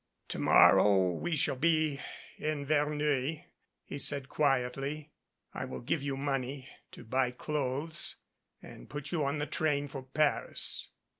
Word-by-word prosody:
"To - - -3
morrow 95 -3 +6
we 165 - -2
shall 135 - +1
be 155 -1 +2 0.4
in 150 -2 -2
Verneuil," 150 0 +1 0.4
he 140 - -6
said 140 -1 0
quietly. 140 +2 0 0.4
"I - - -4
will - - -6
give 140 +5 -1
you 140 -1 -2
money 135 -1 -2 0.3
to - - -10
buy 125 +2 +1
clothes 145 +3 -3 0.5
and - - -12
put 145 -1 -5
you 165 -4 0
on 140 +2 0
the 150 - -1
train 145 -2 0
for 135 -1 -7
Paris." 140 +3 0
140 Hz, 140 wpm, -31 LUFS, 130-150 Hz, 0.5 s, morrow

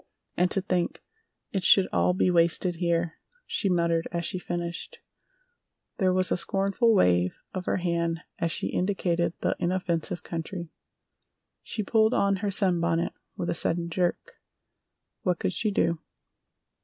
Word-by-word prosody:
"And 180 +1 +2
to 195 - +2
think 180 -2 -1 0.5
it 190 -2 -2
should 190 +1 +6
all 180 - +2
be 185 - +2
wasted 170 +1 +2
here!" 170 -1 0 0.3
she 200 - -1
muttered 170 -2 +1
as 170 -1 -2
she 185 - -2
finished. 175 -1 -4 1.0
There 185 -2 +3
was 185 0 +1
a - - +2
scornful 195 +5 +2
wave 90 - +3 0.2
of 185 -1 -4
her - - 0
hand 170 -2 -1 0.2
as 165 - 0
she - - -2
indicated 175 -3 0
the - - +1
inoffensive 175 -2 -1
country. 170 0 -5 0.9
She 215 - -2
pulled 220 +2 +3
on 200 -1 +2
her 205 +2 -2
sunbonnet 175 -4 +1 0.2
with 175 - -2
a - - +1
sudden 170 0 +1
jerk. 175 0 -2 0.8
"What 180 -2 0
could 180 - -1
she 215 - 0
do?" 170 -4 +1
175 Hz, 145 wpm, -27 LUFS, 170-190 Hz, 1.0 s, should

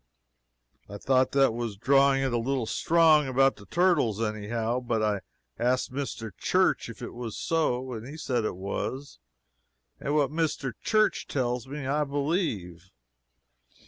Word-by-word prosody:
I 100 - -7
thought 130 +4 +2
that 135 -4 +4
was 115 -3 -4
drawing 135 +3 +4
it 130 -2 -1
a - - +2
little 130 0 -1
strong, 155 +2 +4
about 135 +1 +3
the 100 - -14
turtles, 155 - +2
any 110 -2 -3
how, 115 +2 -1
but 115 -3 -1
I 105 -2 0 0.4
asked 125 +1 0
Mr. 115 -7 -5
Church - - +1
if - - -9
it - - -6
was 120 -3 -6
so, 130 -6 0
and 115 +1 -7
he 150 +3 -8
said 125 -6 -1
it 110 - -2
was, 100 - -5 0.8
and 145 +2 -2
what 145 -3 +2
Mr. 150 -5 -1
Church 215 -1 +2
tells 125 -2 -2
me, 140 0 -6
I 145 +3 +1
believe. 140 - -2
130 Hz, 155 wpm, -27 LUFS, 115-145 Hz, 0.8 s, that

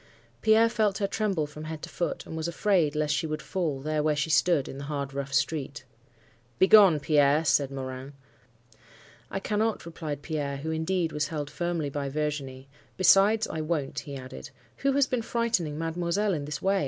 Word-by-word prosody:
Pierre 220 +1 +5
felt 215 -4 +1
her 200 - 0
tremble 200 -6 0
from 150 +1 -9
head 155 -1 -6
to - - -6
foot, 175 - -3
and - - -7
was 160 0 -2
afraid 170 -4 +1
lest 150 -1 +1
she 150 +3 -1
would 155 0 -3
fall, 150 -1 -2
there 155 +1 -1
where 150 0 +1
she 150 +2 -1
stood, 160 -4 +3
in 135 - -7
the 140 - -6
hard 140 -2 -4
rough 140 0 -4
street. 140 -1 -1 0.7
"'Begone, 190 -5 +7
Pierre!' 145 +1 +3
said 140 -2 +3
Morin. 130 0 -6 1.2
"'I 195 - -3
cannot,' 215 0 -1
replied 155 -4 -6
Pierre, 145 -4 -3
who 160 +3 -4
indeed 160 +1 -1
was 150 -1 -1
held 150 -2 -4
firmly 170 -4 -2
by 140 -1 -3
Virginie. 140 -3 -3 0.3
'Besides, 200 +4 +5
I 160 - -3
won't,' 155 -3 -2
he 140 -2 -8
added. 130 - -8 0.3
'Who 275 0 +1
has 280 0 +4
been 250 -2 -1
frightening 220 -10 -1
mademoiselle 170 +5 -1
in 145 -4 -3
this 145 -1 -5
way? 195 +1 +2
155 Hz, 185 wpm, -27 LUFS, 145-185 Hz, 1.2 s, Begone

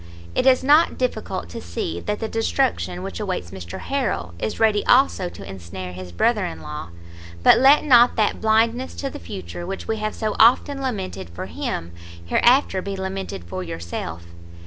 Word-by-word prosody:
It 260 - +1
is 260 -1 +5
not 295 +5 +4
difficult 220 - -2
to - - -7
see 85 -1 -4
that 210 - -3
the 225 - -2
destruction 95 - -1
which 95 -3 -6
awaits 85 - -3
Mr 90 -3 -7
Harrel, 245 - -2
is 110 - -3
ready 215 -2 +3
also 245 -8 +4
to 100 - -11
ensnare 90 -1 -7
his 90 0 -8
brother 85 - +2
in 80 - -5
law; 75 +2 -6 0.5
but - - +7
let 275 +3 +6
not 245 -4 +6
that 215 -2 +1
blindness 225 +3 +2
to 275 -1 -4
the - - -8
future 85 - -7
which 195 +2 -6
we 225 - -1
have 215 0 -3
so 215 -1 -2
often 265 +4 +4
lamented 190 - -4
for 85 - -7
him, 85 +1 -4 0.3
hereafter 240 - +3
be 195 +1 -5
lamented 190 - -5
for 90 +2 -6
yourself. 85 0 -6
190 Hz, 175 wpm, -22 LUFS, -, 0.5 s, but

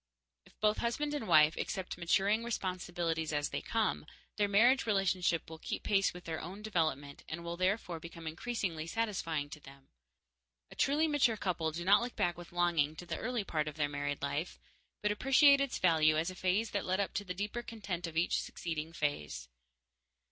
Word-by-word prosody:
If - - -24
both 210 0 +3
husband 290 +6 -1
and 285 -7 -3
wife 155 +1 +6
accept 190 -1 -3
maturing 195 +6 +2
responsibilities 175 -7 -2
as 145 -1 0
they - - -3
come, 215 -8 -1 0.3
their 205 -1 +3
marriage 235 +6 +4
relationship 185 -4 +1
will 160 0 -9
keep - - -4
pace 195 -1 +2
with 180 0 -11
their 160 -1 -4
own 190 +5 -8
development 155 -8 -1
and 170 +1 -5
will 170 0 -4
therefore 185 -1 0
become 165 0 -10
increasingly 165 -1 -3
satisfying 170 -8 -1
to 155 - -8
them. 135 -1 -15 0.8
A - - -11
truly 295 +4 +2
mature 270 -7 +2
couple 170 -5 -1
do 170 +2 -5
not 200 +3 +6
look 245 0 -4
back 175 -1 +1
with 175 0 -11
longing 170 -4 +1
to 175 - -8
the - - -4
early 245 -2 -1
part 155 -5 -1
of 150 - -5
their 145 -2 0
married 145 0 -3
life, - - -2 0.4
but 210 - +2
appreciate 275 +5 +5
its 275 -2 -1
value 155 -3 +4
as 165 +3 0
a - - -10
phase 190 +5 0
that 200 - -1
led 185 +1 +1
up 200 - -1
to 205 - -2
the 180 -2 -5
deeper 210 +5 -3
content 205 -7 -5
of 160 -1 -7
each 170 - +2
succeeding 160 -1 -5
phase. 75 - -3
180 Hz, 190 wpm, -33 LUFS, 160-210 Hz, 0.8 s, wife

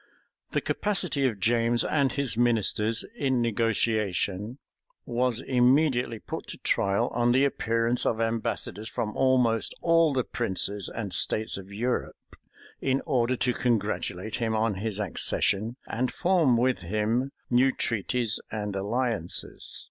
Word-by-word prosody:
The - - -1
capacity 180 -9 0
of 110 -5 -3
James 115 +2 +2
and 140 -4 +1
his 140 -5 +1
ministers 115 -2 +1
in 130 - 0
negotiation 110 -2 0 0.5
was 120 0 0
immediately 125 -1 +2
put - - -7
to - - -5
trial 100 0 +1
on 120 0 +2
the 135 +2 +4
appearance 115 -2 +1
of 110 - 0
ambassadors 115 -2 -2
from 105 -1 -3
almost 125 -4 +2
all 165 -2 +3
the 130 -2 +1
princes 100 -4 0
and 105 -5 -4
states 110 +4 +1
of 95 0 -8
Europe, 120 +5 -3 0.5
in 135 0 0
order 125 0 +1
to 125 0 0
congratulate 110 -3 -1
him 115 -2 -1
on 110 0 +1
his 110 -2 -2
accession, 105 +3 +1
and 125 +2 -1
form 170 -9 +2
with 125 +2 +1
him 110 +8 -1 0.2
new 130 +2 +4
treaties 115 0 -1
and 105 -2 -4
alliances. 105 -2 -2
115 Hz, 135 wpm, -27 LUFS, 110-125 Hz, 0.5 s, the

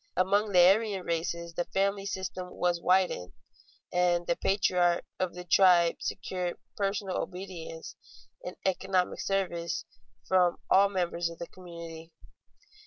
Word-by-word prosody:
Among 200 +3 +2
the 180 - +5
Aryan 200 0 +3
races 170 0 -2
the 175 +1 -2
family 195 +1 0
system 185 -1 -4
was 175 -1 0
widened, 180 - +1 0.6
and 175 -1 +2
the 170 - +1
patriarch 180 -3 +2
of 185 -2 -1
the 180 - -7
tribe 175 -1 +5
secured 180 -2 -3 0.2
personal 195 -1 -1
obedience 180 -3 -7 0.5
and - - -6
economic 190 -1 0
service 170 -7 -2 0.4
from 180 -2 +3 0.2
all 200 +1 +6
members 175 -3 -1
of 170 - -10
the 170 - -5
community. 170 -2 -10
180 Hz, 125 wpm, -29 LUFS, 170-190 Hz, 0.6 s, all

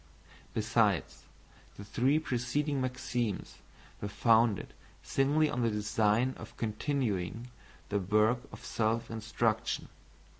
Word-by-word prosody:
Besides, - - +1 0.5
the 100 - -7
three 130 +8 +2
preceding 140 0 -1
maxims 125 -4 -2 0.4
were 100 - -2
founded 110 +1 +3 0.3
singly 145 +3 +2
on 125 -4 -2
the 115 - +3
design 105 +3 +1
of - - -11
continuing 115 -2 -2 0.4
the 100 - +1
work 105 +5 +3
of - - -11
self 115 +1 0
instruction. 110 0 -1
115 Hz, 105 wpm, -31 LUFS, 105-130 Hz, 0.5 s, founded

